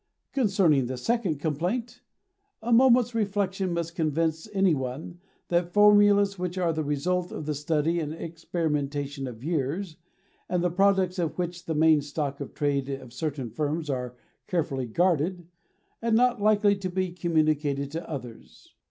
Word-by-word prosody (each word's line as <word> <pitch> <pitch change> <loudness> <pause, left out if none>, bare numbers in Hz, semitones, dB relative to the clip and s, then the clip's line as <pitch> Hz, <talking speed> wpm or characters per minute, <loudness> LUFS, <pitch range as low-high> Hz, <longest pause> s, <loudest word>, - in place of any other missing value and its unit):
Concerning 190 - +3
the 130 0 -4
second 195 - 0
complaint, 195 - -2 0.6
a 235 +1 +1
moment's 245 -1 +5
reflection 195 -3 -1
must 170 -1 -2
convince 160 +2 -1
any 195 -3 +3
one 135 +5 -5 0.3
that 175 0 +1
formulas 205 -1 +5
which 180 0 -3
are 175 -3 +1
the 155 0 -2
result 175 +5 -1
of 155 - -6
the 155 - -1
study 155 +3 0
and 150 -2 -3
experimentation 150 -4 -3
of 120 -1 -9
years, 160 +3 -2 0.5
and 180 -1 0
the 180 - +1
products 190 0 +2
of 165 -3 -2
which 175 -1 -3
are - - -29
the 160 -2 -1
main 160 -2 +5
stock 145 -1 -4
of - - -7
trade 140 -2 0
of 130 -3 -6
certain 135 -3 -4
firms, 150 +4 -2
are 125 -2 -4 0.3
carefully 140 -7 -1
guarded, 175 - +1 0.6
and 230 -1 +2
not 245 -1 +3
likely 205 -1 +4
to 195 -1 -4
be 185 0 -1
communicated 155 -5 0
to 165 +2 -6
others. 125 -7 -9
165 Hz, 155 wpm, -27 LUFS, 145-190 Hz, 0.6 s, moment's